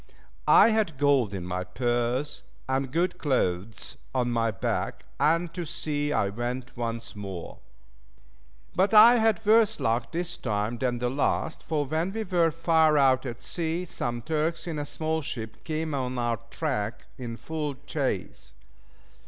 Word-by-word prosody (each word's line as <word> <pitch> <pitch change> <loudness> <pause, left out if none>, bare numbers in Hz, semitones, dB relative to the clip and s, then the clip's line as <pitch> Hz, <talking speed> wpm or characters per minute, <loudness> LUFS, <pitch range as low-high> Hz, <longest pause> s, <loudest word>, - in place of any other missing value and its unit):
I - - +8
had 215 -9 +1
gold 140 -6 +3
in 95 -3 -5
my 90 0 -2
purse, 120 +7 -1 0.3
and 130 0 -1
good 175 +4 0
clothes 110 - -1 0.2
on 125 -1 +1
my 115 -1 +1
back, 100 -3 -2
and 165 +2 +2
to 175 - -3
sea 150 -2 -2
I 100 -8 +1
went 120 +4 -4
once 115 -1 -4
more. 95 -4 -7 1.2
But 195 +4 +3
I 230 +3 +9
had 220 -1 +2
worse 220 0 +5
luck 115 +1 0
this 175 +1 -2
time 110 +1 -2
than 125 -2 0
the 120 +1 -1
last, 145 +3 0
for 150 -2 -1
when 160 +6 -1
we 220 0 -2
were 175 -4 +2
far 160 -1 +3
out 135 -1 +4
at 120 +2 -7
sea, 170 +1 -2
some 120 -8 -3
Turks 160 +4 -1
in 165 -4 -3
a 145 - -3
small 160 +2 -2
ship 110 -6 -6
came 155 -1 -2
on 130 -2 -2
our 120 -1 0
track 120 -9 -2
in 115 -2 -5
full 150 -1 -4
chase. 105 - -3
140 Hz, 155 wpm, -27 LUFS, 120-165 Hz, 1.2 s, I